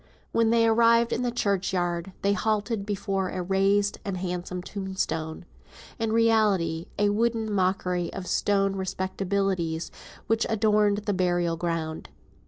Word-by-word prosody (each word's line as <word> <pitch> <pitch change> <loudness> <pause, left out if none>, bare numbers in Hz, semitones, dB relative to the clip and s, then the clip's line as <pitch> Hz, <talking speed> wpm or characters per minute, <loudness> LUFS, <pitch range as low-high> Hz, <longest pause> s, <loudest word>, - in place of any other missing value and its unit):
When 230 -1 +3
they 230 0 +4
arrived 230 +1 +4
in 235 - -1
the 245 - 0
churchyard, 190 -5 -1
they 200 0 +3
halted 215 0 -1
before 195 -2 -1
a 185 - -3
raised 195 +2 +2
and 195 -3 -3
handsome 180 0 -4
tombstone; 185 -5 -4 0.5
in 225 -1 0
reality 210 -8 +2
a 205 0 +3
wooden 225 0 0
mockery 185 -2 0
of 195 - -6
stone 195 +1 +1
respectabilities 190 -3 -2 0.3
which 225 0 +1
adorned 210 -1 +2
the 205 - +1
burial 175 -2 +1
ground. 165 -2 -3
195 Hz, 130 wpm, -26 LUFS, 180-215 Hz, 0.5 s, they